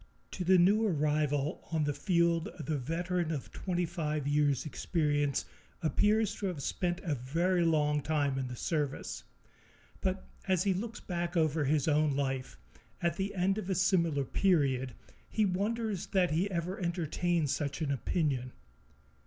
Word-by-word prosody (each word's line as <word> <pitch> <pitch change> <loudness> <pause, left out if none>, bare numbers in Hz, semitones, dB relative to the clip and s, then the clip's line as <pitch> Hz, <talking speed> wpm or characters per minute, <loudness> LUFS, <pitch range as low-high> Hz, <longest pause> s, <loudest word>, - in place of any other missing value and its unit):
To 185 - -4
the 185 +1 +5
new 200 +5 +5
arrival 150 -2 0
on 160 -2 +1
the 145 0 0
field 170 -1 +1
the 155 -1 -2
veteran 170 +5 -1
of 145 -5 -4
twenty 180 -2 -1
five 155 -4 -2
years' 145 -2 +2
experience 145 -2 0 0.4
appears 210 +5 +2
to 200 - -2
have 165 -7 -4
spent 175 +3 -1
a 165 -5 0
very 170 +8 +1
long 150 -2 +2
time 145 -2 0
in 130 - -2
the 125 - -6
service; 145 0 -2 0.8
but 190 0 -2 0.2
as 185 -2 +2
he 195 - +2
looks 225 +5 -4
back 175 -1 -3
over 155 -2 +2
his 145 +1 +2
own 150 -2 +3
life, 135 - -2 0.4
at 170 -2 0
the 195 +1 -2
end 195 +3 +1
of 195 - -6
a 190 - +1
similar 170 -6 +2
period, 135 - +1 0.3
he 215 - +2
wonders 205 +1 -1
that 185 -4 +2
he 175 +6 +1
ever 180 +3 -3
entertained 170 -3 0
such 140 -1 -2
an 155 -4 -1
opinion. 135 -3 -1
165 Hz, 155 wpm, -31 LUFS, 145-185 Hz, 0.8 s, the